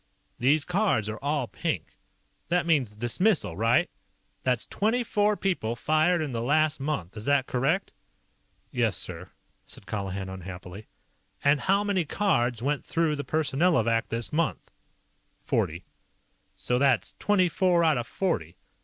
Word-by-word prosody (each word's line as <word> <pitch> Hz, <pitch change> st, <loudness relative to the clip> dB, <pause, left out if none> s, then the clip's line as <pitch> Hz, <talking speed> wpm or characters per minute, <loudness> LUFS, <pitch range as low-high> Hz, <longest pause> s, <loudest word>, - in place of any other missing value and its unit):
These 145 Hz, +4 st, +3 dB
cards 180 Hz, -, +1 dB
are 110 Hz, -, -5 dB
all 145 Hz, -1 st, -1 dB
pink. -, -, -3 dB, 0.5 s
That 175 Hz, 0 st, +1 dB
means 135 Hz, -11 st, +1 dB
dismissal, 120 Hz, -, +1 dB
right? 115 Hz, +5 st, +3 dB, 0.5 s
That's 125 Hz, -3 st, 0 dB
twenty 225 Hz, +4 st, 0 dB
four 210 Hz, -2 st, +1 dB
people 145 Hz, -12 st, -1 dB
fired 155 Hz, +6 st, +2 dB
in 145 Hz, -, -4 dB
the 115 Hz, -2 st, -2 dB
last 155 Hz, +4 st, +2 dB
month, 135 Hz, -, -3 dB
is 105 Hz, 0 st, -7 dB
that 140 Hz, -2 st, +3 dB
correct?" 140 Hz, +11 st, 0 dB, 0.8 s
"Yes, -, -, +1 dB
sir," -, -, -5 dB, 0.3 s
said -, -, -12 dB
Colihan 100 Hz, -2 st, -4 dB
unhappily. 95 Hz, +1 st, -8 dB, 0.6 s
"And 140 Hz, +1 st, +4 dB
how 195 Hz, +5 st, +2 dB
many 200 Hz, -3 st, +1 dB
cards 125 Hz, -, 0 dB
went 145 Hz, +2 st, 0 dB
through 165 Hz, -2 st, 0 dB
the 145 Hz, -, -4 dB
Personnelovac 140 Hz, -7 st, +1 dB
this 115 Hz, +3 st, -3 dB
month?" 165 Hz, +1 st, -1 dB, 0.7 s
"Forty." 85 Hz, +3 st, -1 dB, 0.7 s
"So 125 Hz, 0 st, 0 dB
that's 135 Hz, -3 st, +2 dB
twenty 200 Hz, -3 st, +3 dB
four 175 Hz, 0 st, +2 dB
out 155 Hz, -6 st, +3 dB
of 120 Hz, -, -5 dB
forty. 85 Hz, -, -2 dB
145 Hz, 140 wpm, -27 LUFS, 115-175 Hz, 0.8 s, And